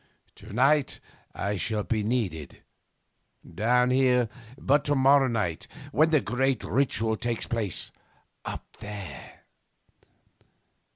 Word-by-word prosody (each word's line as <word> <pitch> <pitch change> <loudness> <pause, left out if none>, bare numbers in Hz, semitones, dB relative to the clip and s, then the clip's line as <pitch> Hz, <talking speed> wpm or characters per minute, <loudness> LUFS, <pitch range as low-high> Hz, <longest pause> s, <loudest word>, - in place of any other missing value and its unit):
To 105 +2 -12
night 135 +6 +2 0.4
I 100 +1 -2
shall 105 +2 -1
be 110 0 -1
needed 105 - -3 0.8
down 125 +7 +2
here, 125 -3 +3 0.3
but 145 +2 +2
to 145 - +1
morrow 135 0 +5
night 105 -9 -2 0.2
when 155 +8 +4
the 155 -3 +3
great 130 +1 0
ritual 115 -4 +1
takes 115 +1 -3
place 110 -6 -2 0.5
up - - -6
there 100 -11 -9
120 Hz, 110 wpm, -27 LUFS, 105-135 Hz, 0.8 s, morrow